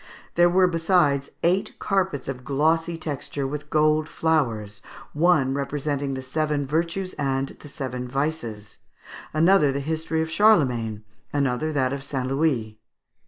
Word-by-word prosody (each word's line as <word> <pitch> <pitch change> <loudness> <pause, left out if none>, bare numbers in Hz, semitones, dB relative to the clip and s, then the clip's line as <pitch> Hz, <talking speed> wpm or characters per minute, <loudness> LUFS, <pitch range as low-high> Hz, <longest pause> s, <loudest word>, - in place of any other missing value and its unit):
There 175 0 +5
were, 185 +1 +4
besides, 165 -5 +2
eight 180 +3 +1
carpets 190 -8 -1
of 130 -2 -5
glossy 165 +5 +1
texture, 145 -2 -4
with 150 +2 -5
gold 155 0 +2
flowers; 115 -11 -1 0.3
one 150 -4 +3
representing 140 0 -2
"The 130 - -5
Seven 150 +1 -1
Virtues 170 +6 -1
and 135 -1 0
the - - -13
Seven 125 -3 -5
Vices;" 125 -6 -3 0.5
another 160 -2 +4
the 140 - -2
history 160 +2 -1
of 160 - -6
Charlemagne; 125 - +3 0.3
another 140 +1 0
that 130 -2 +1
of 140 - -4
St. 135 -2 -3
Louis. 130 -6 0
145 Hz, 135 wpm, -24 LUFS, 135-160 Hz, 0.5 s, There